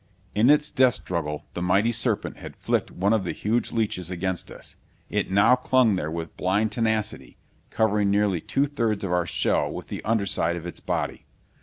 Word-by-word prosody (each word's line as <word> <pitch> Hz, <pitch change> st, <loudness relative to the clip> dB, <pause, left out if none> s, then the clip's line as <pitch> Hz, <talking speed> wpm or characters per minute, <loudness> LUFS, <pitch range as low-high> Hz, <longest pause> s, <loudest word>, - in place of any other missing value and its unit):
In 110 Hz, +5 st, +3 dB
its 150 Hz, 0 st, +4 dB
death 130 Hz, -2 st, +4 dB
struggle 75 Hz, -4 st, -4 dB
the 85 Hz, -, -4 dB
mighty 100 Hz, +6 st, +2 dB
serpent 115 Hz, -2 st, 0 dB
had -, -, -10 dB
flicked -, -, -1 dB
one 100 Hz, +4 st, 0 dB
of 110 Hz, -3 st, +1 dB
the -, -, -3 dB
huge 115 Hz, +3 st, -1 dB
leeches 100 Hz, -6 st, 0 dB
against 95 Hz, 0 st, -3 dB
us. -, -, -11 dB, 0.4 s
It -, -, -1 dB
now 100 Hz, +6 st, +5 dB
clung 125 Hz, -4 st, +3 dB
there 80 Hz, -4 st, -2 dB
with 80 Hz, 0 st, -6 dB
blind 100 Hz, +4 st, +1 dB
tenacity, 110 Hz, -1 st, -1 dB, 0.3 s
covering 105 Hz, -2 st, +1 dB
nearly 100 Hz, -4 st, +1 dB
two 140 Hz, -, 0 dB
thirds 115 Hz, -8 st, -1 dB
of 95 Hz, -, -2 dB
our 90 Hz, -1 st, +1 dB
shell -, -, +1 dB
with -, -, -8 dB
the -, -, -6 dB
underside 100 Hz, -6 st, +1 dB
of 85 Hz, -1 st, -7 dB
its 85 Hz, -, -7 dB
body. -, -, -3 dB
105 Hz, 185 wpm, -25 LUFS, 90-115 Hz, 0.4 s, now